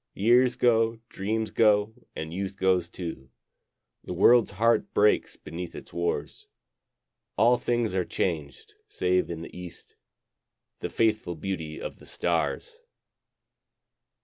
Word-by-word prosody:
Years 120 +4 +4
go, 115 -2 +3
dreams 110 +2 -2
go, 105 -1 +3 0.2
and 80 +1 -5
youth 95 +1 -4
goes 95 -3 +2
too, 80 -8 -7 0.7
The - - -5
world's 120 -2 +5
heart 115 +1 +2
breaks 105 +1 +3
beneath 85 +1 -7
its - - -10
wars, 85 0 -3 0.9
All 115 +4 +5
things 120 -3 0
are 95 -1 +1
changed, 80 -6 -3 0.2
save 90 0 +1
in 85 -1 -5
the - - -11
east 90 -1 -11 0.8
The - - -4
faithful 110 -6 0
beauty 80 -3 -5
of - - -7
the - - -16
stars. 470 -2 -2
100 Hz, 120 wpm, -27 LUFS, 90-115 Hz, 0.9 s, world's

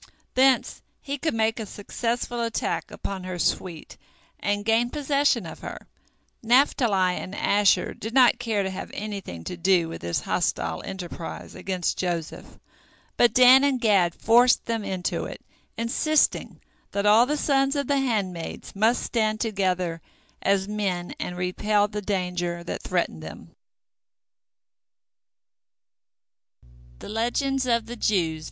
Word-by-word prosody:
Thence 260 -1 +3 0.2
he 280 0 -5
could 315 -3 -1
make 220 +1 +1
a 220 - -4
successful 235 +4 -3
attack 230 -1 -2
upon 195 -2 -6
her 185 -1 -5
suite, 170 -1 -2 0.4
and 205 0 -1
gain 225 +2 +2
possession 280 - +1
of 160 - -9
her. - - -8 0.5
Naphtali 225 -7 +3
and 185 - -6
Asher 205 -1 +2
did 220 - -7
not 245 -1 +5
care 225 -4 0
to 190 - -3
have 190 - -6
anything 200 - -6
to 180 - -5
do 180 -1 +2
with 165 - -7
this 85 0 -2
hostile 80 -1 -1
enterprise 175 -3 -7
against 185 -3 -2
Joseph, 170 -3 -4 0.6
but 240 - +4
Dan 255 +2 +8
and 275 -3 +2
Gad 195 -7 +3
forced 240 +3 +4
them 230 -2 -2
into 185 -2 -2
it, - - -9 0.3
insisting 285 +7 +1 0.3
that 200 0 -1
all 220 +4 +6
the 300 +2 0
sons 275 -1 +2
of 285 -1 0
the 285 -1 +1
handmaids 200 -13 -3
must 220 +4 +2
stand 215 -2 0
together 185 -6 -1 0.4
as 195 -1 +1
men 195 -4 -2
and 180 - -4
repel 205 +3 +1
the 210 0 -5
danger 180 -3 -2
that - - -5
threatened 175 - -2
them. 80 -1 -11
205 Hz, 125 wpm, -25 LUFS, 180-240 Hz, 0.6 s, Dan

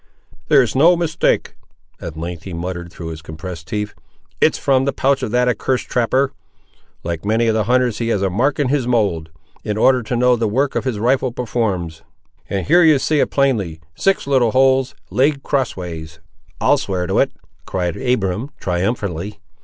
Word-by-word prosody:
"There's 125 -4 +4
no 170 +6 +5
mistake," 165 -2 0 0.5
at 80 -2 -7
length 85 0 -5
he 95 +1 -8
muttered 85 0 -5
through 85 -2 -7
his 80 -1 -7
compressed 80 +1 -8
teeth. 105 +2 -3 0.5
"It - - +5
is - - -4
from 135 -1 +2
the 140 - +1
pouch 135 +1 +1
of 130 - -2
that 125 +2 +2
accursed 125 +1 -1
trapper. 130 +3 +1 0.7
Like 85 -1 -4
many 110 +3 +1
of 110 - +2
the 110 -2 0
hunters 125 -2 +1
he 115 - -1
has 105 -4 0
a 95 - +1
mark 130 +9 +1
in 145 -4 +1
his 135 -3 0
mould, 100 -10 0 0.3
in 105 0 -2
order 130 +3 +4
to 115 +2 -3
know 125 +1 +4
the 115 -1 0
work 135 +6 0
his 130 -5 -1
rifle 125 +3 +1
performs; 100 -9 -2 0.5
and 95 -2 -2
here 175 +3 +5
you 160 -4 +6
see 150 +3 +1
it - - +2
plainly—six 100 - 0
little 130 -4 +3
holes, 130 0 +3 0.2
laid 140 +1 +2
crossways." 85 - -3 0.4
"I'll - - +3
swear 90 -2 -2
to 95 - 0
it!" - - +2 0.4
cried 90 -3 -2
Abiram, 125 -2 -1
triumphantly. 95 +1 -2
115 Hz, 175 wpm, -19 LUFS, 90-130 Hz, 0.7 s, you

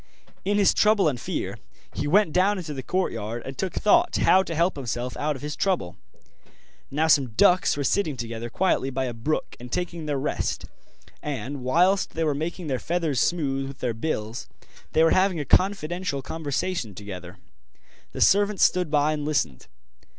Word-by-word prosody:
In 205 +1 +1
his 200 -2 +4
trouble 210 -4 +4
and 125 -5 -1
fear - - -4 0.3
he - - -3
went 180 0 +3
down 195 +3 +3
into 165 -5 -5
the 135 - -5
courtyard 120 - -2
and 135 - -6
took 190 +5 -3
thought 340 +11 +3
how 190 - +5
to 170 -3 -4
help 170 +4 +2
himself 125 -2 -4
out 150 0 -1
of 135 - -10
his 150 0 -4
trouble. 180 - -1 0.9
Now 150 +3 +1
some 140 -7 +3
ducks 180 +7 +4
were 145 - -1
sitting 155 -2 0
together 115 0 -5
quietly 175 -4 +1
by 130 0 -2
a 125 - -3
brook 115 +8 -2
and 125 0 -10
taking 170 -3 -3
their 145 -2 0
rest; 135 +3 -2 0.6
and, 140 -1 -4
whilst 180 +10 +2
they 165 - 0
were 150 -2 +1
making 165 +5 -4
their 130 -4 -1
feathers 165 -6 -1
smooth 135 -5 0
with 135 -1 -9
their 125 -2 -2
bills, 110 -2 -4 0.4
they 160 - +5
were 165 - +4
having 185 -2 +3
a 145 - -3
confidential 175 -4 +1
conversation 145 - -3
together. 90 -2 -8 0.7
The - - -6
servant 205 0 +4
stood 180 -3 +3
by 150 0 +2
and 150 -1 -3
listened. 145 - -1
150 Hz, 180 wpm, -25 LUFS, 130-180 Hz, 0.9 s, how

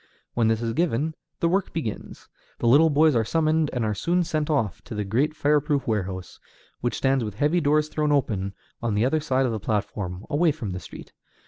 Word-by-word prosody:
When 115 -2 +2
this 115 +1 +1
is 115 -1 -1
given, 160 -1 0 0.3
the 170 - +3
work 185 +3 0
begins; 145 -10 -5 0.3
the - - -4
little 150 +7 +6
boys 155 0 +4
are 115 - +3
summoned, 155 +4 +1
and 120 -3 -1
are 105 - 0
soon 175 - +1
sent 155 -2 -2
off 125 - 0
to 110 - -7
the 105 - -1
great 135 +10 0
fire 150 -1 +3
proof 145 -2 -1
warehouse, 95 -4 -3 0.4
which 120 - -1
stands 135 -2 +2
with 105 -2 -5
heavy 150 +9 +2
doors 150 +1 +2
thrown 150 -1 0
open, 100 -9 0 0.3
on 115 -3 -1
the 105 +3 +2
other 155 +5 +2
side 135 -3 +1
of 125 - 0
the 110 - -2
platform, 105 -3 -3
away 160 +3 +3
from 120 -10 -5
the 90 - -4
street. 85 - -11
135 Hz, 215 wpm, -25 LUFS, 110-155 Hz, 0.4 s, little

